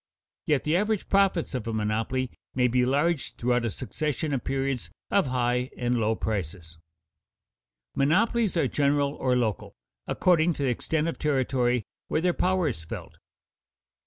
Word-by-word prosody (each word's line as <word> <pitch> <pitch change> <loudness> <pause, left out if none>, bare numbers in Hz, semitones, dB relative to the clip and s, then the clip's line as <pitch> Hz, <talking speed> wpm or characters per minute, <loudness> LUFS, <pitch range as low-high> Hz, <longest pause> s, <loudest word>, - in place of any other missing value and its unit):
Yet 150 -4 +2
the 155 +2 +1
average 210 +2 0
profits 195 -5 +2
of 125 -4 -3
a 115 - -2
monopoly 110 +4 -1 0.2
may 125 -1 +3
be 125 +1 +2
large 145 +3 +1
throughout 120 0 +1
a - - +1
succession 150 +5 -3
of 130 - -1
periods 135 -2 -2 0.2
of 200 -6 +3
high 125 0 0
and 120 -1 0
low 110 0 +1
prices. 85 -6 -4 1.1
Monopolies 210 - +2
are 150 - +3
general 140 +1 +1
or 130 -3 0
local, 115 -5 -1 0.3
according 175 -1 +3
to 145 - -4
the 135 - +2
extent 155 +6 -1
of 165 - -3
territory 130 -5 +1 0.2
where - - 0
their 180 0 +2
power 185 -2 +1
is 90 - -3
felt. 80 - -8
135 Hz, 155 wpm, -27 LUFS, 120-160 Hz, 1.1 s, may